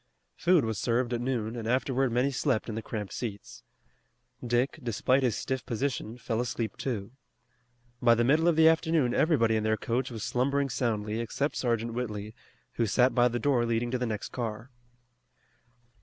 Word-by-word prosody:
Food 175 -6 +3
was 110 -3 -2
served 120 +2 0
at 120 - -1
noon 120 -3 -2
and 115 -2 -5
afterward 130 +1 +1
many 125 +4 +1
slept 130 -3 0
in - - -3
the 110 - -3
cramped 105 -3 -5
seats. 105 -5 -6 0.8
Dick, 120 +2 0
despite 125 +3 +1
his 125 -5 +1
stiff 130 -1 -3
position, 120 -1 -3
fell 115 -1 -2
asleep 115 -3 -3
too. 115 -6 -4 0.9
By 120 -1 +5
the 120 - +2
middle 155 +7 +3
of 170 - +4
the 160 0 +6
afternoon 160 -5 +3
everybody 120 -9 +3
in 110 - 0
their 110 0 +1
coach 120 +4 -1
was 115 -4 -6
slumbering 140 +3 0
soundly 110 -3 -1
except 130 +5 -2
Sergeant 115 -2 -1
Whitley, 110 -3 -4 0.4
who 115 - +2
sat 125 +5 +3
by 120 +1 +4
the 120 0 -1
door 125 0 +2
leading 115 +1 0
to 125 - -1
the 125 - -1
next 105 -2 -4
car. 115 +1 -5
120 Hz, 175 wpm, -29 LUFS, 115-130 Hz, 0.9 s, the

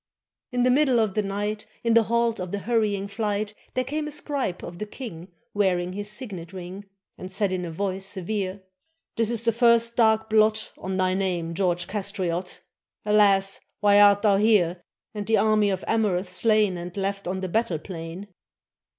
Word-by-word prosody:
In 245 -1 +1
the 250 - +4
middle 265 -2 +3
of 215 -3 +1
the 215 - +1
night, 205 +1 -3 0.2
In 230 -1 +2
a 230 - +7
halt 235 0 0
of 180 -1 -5
the 205 - -2
hurrying 210 -2 0
flight, 205 0 -2 0.2
There 255 - +1
came 300 +4 -3
a - - -5
scribe 285 -10 -3
of 175 0 -8
the 210 - -4
king 185 -7 -9 0.2
Wearing 180 -3 +1
his 205 +1 -5
signet 200 -7 -6
ring. 185 +2 -8 0.3
And 185 - -7
said 200 0 0
in 180 -1 -2
a 170 - -5
voice 190 +2 -3
severe: 195 0 -3 0.5
"This 225 -1 0
is 235 -1 -1
the 230 - +3
first 235 0 +3
dark 220 -1 +3
blot 215 0 +2
~ - - -31
On 190 0 -3
thy 185 0 +2
name, 180 -3 -1
George 175 -1 0
Castriot! 190 -3 -3 0.4
Alas! 200 -2 +3 0.2
why 205 0 +5
art 205 0 +6
thou 205 -2 +4
here. 190 -5 +3 0.3
And 210 -2 -5
the 225 - +3
army 215 -1 +3
of 190 -1 -2
Amurath 195 -5 0
slain, 215 -2 +2
And 175 +2 -8
left 195 0 -2
on 190 +1 -2
the 185 - -2
battle 185 -3 0
plain?" 165 +3 -8
205 Hz, 185 wpm, -25 LUFS, 185-220 Hz, 0.5 s, a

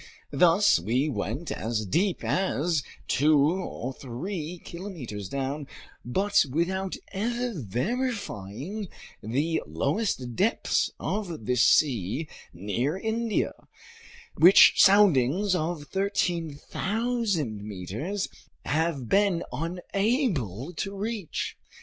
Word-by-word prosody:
Thus 180 - +5
we 120 - 0
went 125 +6 -3
as 110 -1 -2
deep 180 - 0
as 170 -4 +1 0.3
two 150 +2 +4
or 145 -4 0
three 155 - -5
kilometers 150 - -7
down 140 +1 -3 0.4
but 195 +11 +2
without 185 +6 -1 0.2
ever 235 +4 -1
verifying 180 - -3 0.3
the 145 +9 0
lowest 130 - -1
depths 220 +5 +1
of 175 - -3
this 125 0 +2
sea 130 - +2 0.2
near 105 - -2
India, 225 +2 -1 0.8
which 180 +5 +8
soundings 190 -2 +5
of 165 -2 -1
13,000 190 - -1
meters 105 - -4 0.4
have 155 -5 0
been 195 - +2
unable 175 - -1
to 195 0 -3
reach. 210 -4 -3
165 Hz, 90 wpm, -27 LUFS, 125-200 Hz, 0.8 s, which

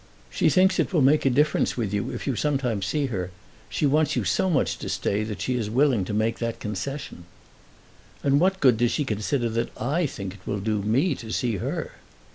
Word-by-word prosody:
"She - - +2
thinks 190 0 +3
it - - +1
will 155 -6 +4
make 140 +1 +4
a - - +5
difference 145 +2 +2
with 105 -5 -2
you 100 -1 -1
if - - -5
you 135 - 0
sometimes 125 -8 0
see 150 -2 0
her. 90 -2 -2 0.4
She - - 0
wants 150 +2 +2
you 120 - 0
so 95 - +1
much 155 -6 +1
to - - -5
stay 105 +2 0
that 110 -1 -5
she 130 - 0
is 110 -4 -2
willing 125 -4 +2
to - - -5
make 110 +2 0
that 115 -1 -3
concession." 105 - -5 1.0
"And 140 0 +3
what 190 +3 +2
good 125 -4 +5
does 120 +1 +2
she 150 - 0
consider 115 +3 -1
that 115 +1 -1
I 150 +8 0
think 100 -7 -6
it 95 -1 -17
will 100 - -1
do 105 +1 -1
me 130 - +2
to 115 -4 -8
see 115 -2 0
her?" - - -3
120 Hz, 220 wpm, -25 LUFS, 105-145 Hz, 1.0 s, a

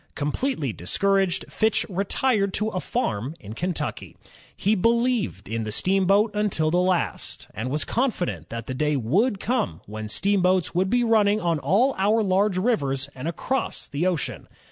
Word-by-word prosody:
Completely 150 - -1
discouraged, 195 - +1
Fitch 220 0 +1
retired 200 +2 0
to 215 +1 0
a 185 - -3
farm 135 - -2
in 105 +1 -9
Kentucky. 175 +7 -4 0.4
He 205 - +2
believed 230 - +1
in 115 +2 -2
the 110 - -4
steamboat 195 - +2
until 190 -7 0
the 175 - +3
last, 180 -1 -1
and 115 +5 -4
was 150 +3 -1
confident 175 - -1
that 115 -1 -5
the 130 - -4
day 150 +3 0
would 190 - +1
come 240 0 -1
when 110 +1 -6
steam 200 - +1
boats 185 -1 +2
would 185 +2 +1
be 245 +2 +2
running 215 -2 +3
on 170 -4 0
all 200 - +3
our 215 +3 +3
large 195 0 +2
rivers 140 - 0
and 130 +4 -6
across 260 +10 -2
the 150 +6 -1
ocean. 175 -6 -2
185 Hz, 165 wpm, -24 LUFS, 140-215 Hz, 0.4 s, the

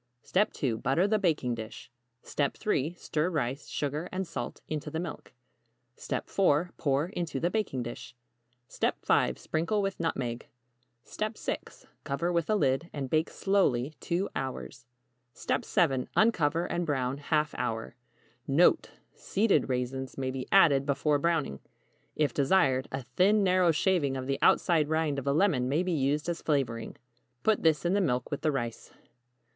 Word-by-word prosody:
2. 115 -5 -1
Butter 165 +9 +2
the 215 +1 +2
baking 155 -10 +1
dish. 110 0 -8 0.3
3. 150 +1 -1
Stir 160 0 -1
rice, 140 -4 -2
sugar 150 +4 -3
and 190 +1 -2
salt 165 - -5
into 150 -1 -4
the 160 - -3
milk. 170 -2 -6 0.9
4. 175 -2 +2
Pour 145 +3 0
into 170 -8 -3
the 175 +4 0
baking 195 - -1
dish. 120 +1 -8 0.5
5. - - +1
Sprinkle 170 +7 -1
with 195 -1 -2
nutmeg. 130 -8 -2 0.6
6. 215 - -5 0.2
Cover 145 +5 -1
with 170 -2 0
a 215 - +3
lid, 150 -3 +1
and 135 -3 -5
bake 155 +1 +2
slowly 155 -9 +1
2 180 +4 -1
hours. 125 -2 -5 0.5
7. 160 - 0
Uncover 170 -7 +3
and 175 - -2
brown 135 -2 -1
½ 150 +1 0
hour. 115 -1 -3 0.5
NOTE. 170 - +4 0.2
Seeded 205 -5 +1
raisins 130 +1 -3
may 130 -1 -2
be 130 -1 -5
added 150 -8 +6
before 145 +1 +2
browning. 155 - 0 0.6
If 145 -5 +1
desired, 135 -3 +2
a 130 0 -4
thin 190 - +3
narrow 185 -2 +4
shaving 160 -4 +1
of 130 - -4
the 135 0 -1
outside 160 -4 +3
rind 155 -3 0
of 135 - -8
a - - +3
lemon 145 -6 +2
may 155 +6 +1
be 185 - -1
used 150 +1 0
as 170 -1 -2
flavoring. 125 -7 -1 0.5
Put 220 -1 +2
this 160 0 +2
in 175 - +2
the 200 - +3
milk 125 -7 -1
with 145 - -3
the 155 - +2
rice. 120 -5 -4
150 Hz, 150 wpm, -29 LUFS, 135-175 Hz, 0.9 s, added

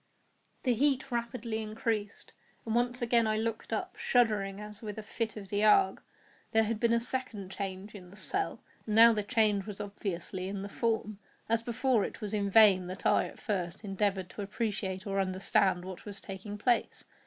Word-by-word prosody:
The 250 - +3
heat 275 +2 +1
rapidly 235 -1 -2
increased, 215 -1 -3 0.3
and 225 - -2
once 245 +1 +1
again 235 -1 +3
I 215 0 +1
looked 225 0 -3
up, - - -3
shuddering 210 -5 +1
as 210 -1 -9
with 210 -2 -6
a 220 - -5
fit 220 +1 -3
of 195 -2 -8
the 205 +1 0
ague. 300 - +5 0.5
There 225 0 +5
had 220 0 -2
been 235 0 +2
a 235 - +4
second 230 -6 -3
change 195 +1 -5
in 185 -4 -11
the 195 - -14
cell—and 220 - -3
now 230 +1 +9
the 210 - 0
change 210 -2 +2
was 205 -2 -6
obviously 190 -2 -4
in 195 0 -4
the 200 - -6
form. 220 -2 -1 0.3
As 230 0 +2
before, 240 -1 +1
it - - -5
was 210 -1 -4
in 200 -1 0
vain 195 -4 +6
that 185 +1 -7
I, - - +4
at - - -10
first, 190 -2 -3
endeavoured 195 -2 -1
to - - -7
appreciate 200 -2 -3
or 195 -1 -1
understand 185 -1 +1
what 185 -1 -8
was 205 -1 -6
taking 200 +2 -7
place. 240 +3 0
210 Hz, 190 wpm, -31 LUFS, 195-230 Hz, 0.5 s, now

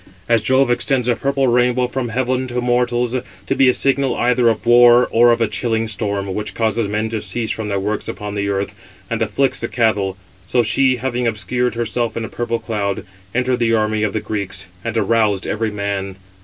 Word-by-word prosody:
As 115 -2 +3
Jove 130 +2 +3
extends 125 0 0
a 120 - +3
purple 135 +2 0
rainbow 125 +1 +2
from 125 -1 -3
heaven 130 +2 -1
to 125 0 -3
mortals, 120 0 0 0.3
to - - -1
be 135 -1 +5
a - - +4
signal 135 -1 +1
either 125 -1 +3
of 110 0 -2
war, 120 +1 +6
or 120 +1 +5
of 120 - +2
a 115 - +3
chilling 115 -2 -1
storm, 100 -3 -2
which 105 +2 -4
causes 110 -1 0
men 105 +2 -1
to 110 -1 -3
cease 115 -3 -2
from 110 -1 -4
their 100 -1 0
works 105 +2 -3
upon 105 -1 -5
the 100 -1 -2
earth, 100 +1 -2 0.4
and 115 -1 -1
afflicts 115 +5 +1
the 115 - -2
cattle; 105 -6 0 0.3
so 120 +3 +2
she, 130 +4 +3
having 125 -1 -2
obscured 115 +4 -1
herself 115 0 -2
in 115 - -2
a - - -8
purple 120 -1 -2
cloud, 105 -4 -3 0.3
entered 125 0 +1
the 115 -1 +2
army 110 -1 0
of 105 -2 0
the 110 - -1
Greeks, 100 -2 -4 0.2
and 115 0 -3
aroused 110 -2 +1
every 110 +1 -1
man. 100 -2 -3
115 Hz, 205 wpm, -19 LUFS, 105-125 Hz, 0.4 s, war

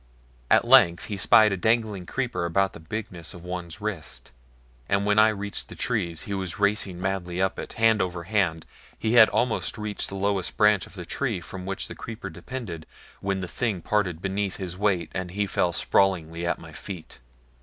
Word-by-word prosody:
At - - +5
length 85 0 +6
he 105 - -4
spied 110 +2 +6
a 100 - 0
dangling 110 -2 +1
creeper 125 -8 -2
about 95 +3 +1
the - - -10
bigness 90 -1 -5
of 85 - -11
one's 90 -1 -6
wrist, 80 - -5 0.6
and 100 0 +2
when 105 +1 +4
I 110 - +8
reached 105 -1 -4
the - - -9
trees 90 -9 -1
he 100 - -5
was 95 -2 -2
racing 100 -3 +1
madly 90 -2 -2
up 95 0 0
it, - - -6
hand 110 -2 +4
over 90 -2 -2
hand. 85 -4 0 0.3
He 110 +1 0
had 115 -2 +8
almost 120 -2 0
reached 105 -1 -4
the 100 - -6
lowest 100 -1 -1
branch 105 -3 +4
of - - -16
the 90 -3 -7
tree 120 -4 -2
from 90 +2 -8
which 95 - -3
the - - -7
creeper 110 -4 -7
depended 90 -6 -7 0.3
when 95 -1 -1
the 90 - -4
thing 105 -1 -2
parted 90 -6 0
beneath 95 0 -1
his 90 -3 -5
weight 95 -4 0
and 95 -1 -3
he 100 +3 -1
fell 90 -2 +1
sprawling 85 -2 +2
at - - 0
my - - -12
feet. 90 -5 -8
95 Hz, 195 wpm, -26 LUFS, 90-105 Hz, 0.6 s, I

